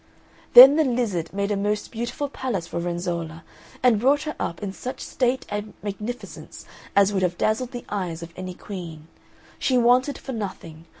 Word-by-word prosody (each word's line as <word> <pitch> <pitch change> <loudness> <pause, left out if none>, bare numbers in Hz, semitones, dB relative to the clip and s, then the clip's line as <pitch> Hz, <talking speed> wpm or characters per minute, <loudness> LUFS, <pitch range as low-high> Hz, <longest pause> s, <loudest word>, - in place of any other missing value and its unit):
Then 270 +4 +11
the 315 - +4
lizard 235 - -1
made 200 +1 -2
a - - +1
most 205 +1 -2
beautiful 240 +5 -3
palace 250 -10 -3
for 170 0 -4
Renzolla, 170 -2 -4 0.4
and 240 -4 +5
brought 280 +5 +3
her 305 -1 -4
up 170 - -4
in 195 -1 -4
such 255 +5 -6
state 255 0 -1
and 205 +1 -5
magnificence 210 +4 -7 0.3
as 200 0 +4
would 190 - 0
have 180 -1 0
dazzled 225 +3 0
the 245 -1 -8
eyes 175 -5 -4
of 170 0 -10
any 185 -1 -6
queen. 165 -6 -8 0.5
She 255 - +2
wanted 250 +4 +3
for 270 - -8
nothing. 185 -8 -6
205 Hz, 175 wpm, -24 LUFS, 175-245 Hz, 0.5 s, Then